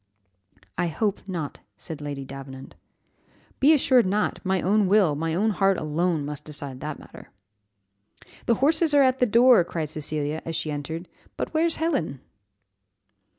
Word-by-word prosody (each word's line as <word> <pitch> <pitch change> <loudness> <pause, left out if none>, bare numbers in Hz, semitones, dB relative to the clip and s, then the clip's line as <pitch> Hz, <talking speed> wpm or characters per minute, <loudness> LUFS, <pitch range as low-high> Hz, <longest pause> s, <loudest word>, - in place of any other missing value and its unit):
"I 175 - +1
hope 200 +5 -2
not," 165 -6 -5 0.2
said 150 +8 -8
Lady 140 -2 -5
Davenant. 135 0 -10 0.9
"Be 285 +3 +5
assured 260 -7 +4
not; 210 +3 0
my 190 -1 +1
own 205 +2 +2
will, 195 -5 +4
my 160 +2 -2
own 215 +5 +2
heart 195 -1 +2
alone, 155 0 -1
must 150 0 -5
decide 140 -4 -4
that 150 +1 -5
matter." - - -14 1.2
"The 235 - +4
horses 310 +4 +2
are 285 - +6
at 260 0 +2
the 250 - +3
door!" 235 -2 +6
cried 165 -3 -4
Cecilia, 155 0 -3
as 165 - -5
she 155 - -2
entered; 160 +4 -5 0.3
but - - -4
"where's 325 +1 +2
Helen?" 170 - -1
170 Hz, 150 wpm, -25 LUFS, 150-220 Hz, 1.2 s, are